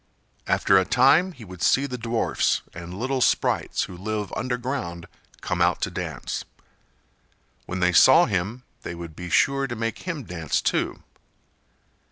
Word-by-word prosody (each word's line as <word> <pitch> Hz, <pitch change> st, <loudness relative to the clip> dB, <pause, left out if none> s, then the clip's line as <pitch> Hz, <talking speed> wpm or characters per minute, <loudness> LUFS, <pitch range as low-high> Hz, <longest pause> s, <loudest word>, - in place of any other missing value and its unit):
After 95 Hz, -1 st, +4 dB
a -, -, +2 dB
time 145 Hz, -, +4 dB
he 125 Hz, -10 st, -12 dB
would 90 Hz, -2 st, -11 dB
see 140 Hz, -, +3 dB
the 130 Hz, -3 st, -4 dB
dwarfs 115 Hz, -1 st, 0 dB
and 85 Hz, +2 st, -8 dB
little 130 Hz, +3 st, -1 dB
sprites -, -, +1 dB
who 90 Hz, -, -7 dB
live 105 Hz, +2 st, -4 dB
underground 125 Hz, -8 st, -3 dB, 0.4 s
come -, -, -2 dB
out -, -, +3 dB
to -, -, -1 dB
dance. -, -, -4 dB, 1.2 s
When 95 Hz, +1 st, -4 dB
they 90 Hz, 0 st, +3 dB
saw 130 Hz, -, +7 dB
him 105 Hz, +6 st, -2 dB, 0.2 s
they 85 Hz, -, -6 dB
would 85 Hz, -2 st, -9 dB
be 90 Hz, 0 st, -7 dB
sure 135 Hz, +9 st, +2 dB
to 120 Hz, -, -5 dB
make 115 Hz, 0 st, -3 dB
him 170 Hz, -6 st, -5 dB
dance 85 Hz, -7 st, -2 dB
too. -, -, -1 dB
115 Hz, 155 wpm, -24 LUFS, 90-130 Hz, 1.2 s, saw